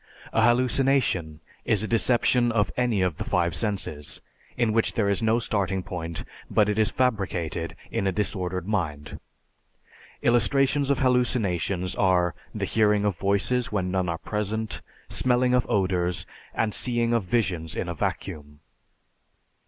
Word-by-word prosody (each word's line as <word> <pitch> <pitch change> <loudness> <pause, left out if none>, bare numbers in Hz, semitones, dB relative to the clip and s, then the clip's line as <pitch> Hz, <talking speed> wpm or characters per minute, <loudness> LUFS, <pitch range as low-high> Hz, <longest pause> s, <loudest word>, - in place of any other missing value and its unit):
A 115 - +3
hallucination 120 - +2 0.2
is 110 -2 +2
a - - -1
deception 120 +1 +3
of 105 -4 +1
any 120 -6 +1
of 90 -5 -1
the - - -3
five 85 -1 +1
senses, 95 -9 -2 0.4
in 115 -3 +2
which 115 0 +2
there 105 -3 +1
is 100 +2 +1
no 110 +1 +3
starting 100 -5 -1
point 85 -2 -5 0.3
but 105 - +3
it 105 +1 0
is 110 - +3
fabricated 95 -9 -1 0.2
in 100 - 0
a - - +2
disordered 95 -3 -2
mind. 80 -9 -3 1.0
Illustrations 135 +4 +3
of 140 - +3
hallucinations 100 -8 +1
are 90 -3 +2 0.2
the - - -1
hearing 105 -2 +2
of 100 -3 +1
voices 100 +5 +1
when 95 -3 -1
none 95 -2 0
are 85 - -1
present, 105 +3 -3 0.3
smelling 125 0 +2
of 125 -1 +2
odors, 90 -2 0 0.3
the 110 - +1
seeing 120 +1 0
of 115 - +3
visions 90 -6 -1
in - - -2
a 85 - -2
vacuum. 75 -2 -4
105 Hz, 145 wpm, -26 LUFS, 90-120 Hz, 1.0 s, A